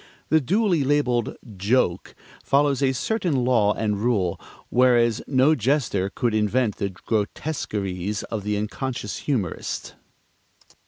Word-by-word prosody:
The 160 0 +4
duly 185 - +2
labeled 130 -5 +1 0.2
"joke" 100 -2 0 0.3
follows 140 0 +2
a 135 -1 +3
certain 140 - 0
law 110 -5 +3
and 105 -2 -1
rule; 105 -7 0 0.3
whereas 120 -2 +3
no 135 +3 +4
jester 120 -7 0
could 115 +2 -1
invent 110 +2 +1
the 100 - -1
grotesqueries 105 - -3
of 110 -3 -5
the 105 0 -1
unconscious 105 0 -4
humorist. 115 - -3
120 Hz, 115 wpm, -24 LUFS, 105-135 Hz, 0.3 s, The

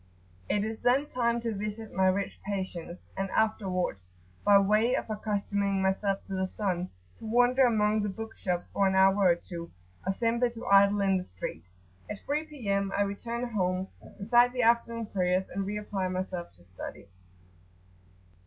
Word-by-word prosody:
It 205 - +1
is 220 +1 -4
then 250 +4 +3
time 235 -1 +1
to 230 -1 -2
visit 210 +2 -5
my 190 0 +3
rich 190 +1 -1
patients, 185 -3 -4
and 195 0 -2
afterwards, 185 - -1 0.3
by 205 -1 +7
way 215 +5 +3
of - - -2
accustoming 200 -2 -1
myself 195 +1 0
to 195 - -7
the 190 0 0
sun, 185 -3 -2 0.3
to - - -9
wander 245 +3 +4
among 215 -2 +2
the 205 - -1
bookshops 190 -4 -4
for 195 - +2
an 190 - +1
hour 190 +1 +5
or 170 - +5
two, 170 -1 -8 0.3
or 190 - 0
simply 235 +4 +1
to 230 - -8
idle 200 +1 +5
in 195 -1 +3
the 180 - -3
street. 90 - -7 0.4
At 210 - -7
3 300 +2 -1
P.M. 200 -9 -1
I 205 - +4
return 235 +5 -3
home, 185 -3 -1 0.3
recite 240 +4 +4
the 250 -1 0
afternoon 230 0 +2
prayers, 185 -2 0
and 195 +1 -3
re 210 +1 -2
apply 200 -3 -2
myself 185 -1 -4
to 85 0 -20
study. 90 +1 -9
200 Hz, 170 wpm, -29 LUFS, 190-225 Hz, 0.4 s, by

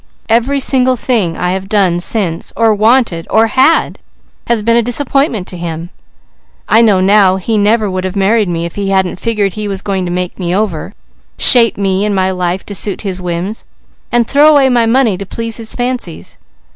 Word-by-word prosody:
Every 240 +5 +1
single 255 -1 +3
thing 220 -9 -1
I 180 0 -1
have 190 +1 -4
done 190 -5 +1
since, 175 -3 0
or 225 -1 +2
wanted 215 -5 +1
or 220 +1 +3
had, 260 +8 +1 0.5
has 235 -3 0
been 230 +1 +2
a 235 - +3
disappointment 245 - -1
to 180 - -7
him. 170 0 -6 0.8
I 225 - +4
know 205 -5 +3
now 195 -1 +4
he 190 +4 -2
never 215 +1 +2
would 185 -1 -3
have 185 +1 -4
married 205 +1 +1
me, 170 -1 -3
if 170 - -6
he 200 -1 -3
hadn't 190 -2 0
figured 210 -4 -1
he 215 -1 -5
was 195 -1 -5
going 190 -2 -2
to - - -4
make 180 +1 -4
me 175 -1 -2
over; 195 -2 -3 0.4
shape 235 -3 +5
me 195 -1 0
and 210 -1 -1
my 190 0 0
life 180 0 -3
to 205 - -7
suit 200 0 -3
his 190 -3 -5
whims, 180 +4 -4 0.5
and 235 -1 +1
throw 290 +2 +4
away 285 -3 +4
my 240 -2 +2
money 230 -5 +1
to 200 - -5
please 230 +2 -3
his 225 -1 -6
fancies. 245 -9 -5
205 Hz, 195 wpm, -12 LUFS, 185-230 Hz, 0.8 s, shape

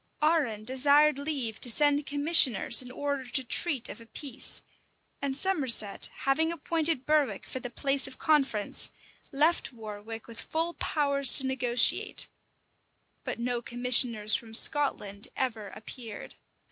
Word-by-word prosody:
Arran 290 -10 0
desired 280 +3 +3
leave 275 -7 -3
to 245 - +2
send 290 +3 +2
commissioners 285 - +4
in 250 - -10
order 280 +1 -4
to 245 +2 +1
treat 265 +1 +1
of - - -10
a 230 - -16
peace; 270 +1 -6 0.6
and 275 -1 -1
Somerset, 270 - +2
having 320 +4 0
appointed 320 -3 -2
Berwick 300 -3 0
for 260 - -6
the 245 - -7
place 275 +3 0
of 265 - -11
conference, 270 -9 0 0.4
left 305 +4 0
Warwick 220 -1 -9
with 230 -1 -10
full 330 +2 -3
powers 280 -5 +3
to 270 - +3
negotiate: 250 -2 0 0.9
but - - -5
no 240 0 -3
commissioners 240 -3 +3
from 225 -1 -3
Scotland 210 -8 +1
ever 225 -5 -3
appeared. 220 +1 -9
265 Hz, 135 wpm, -27 LUFS, 235-290 Hz, 0.9 s, commissioners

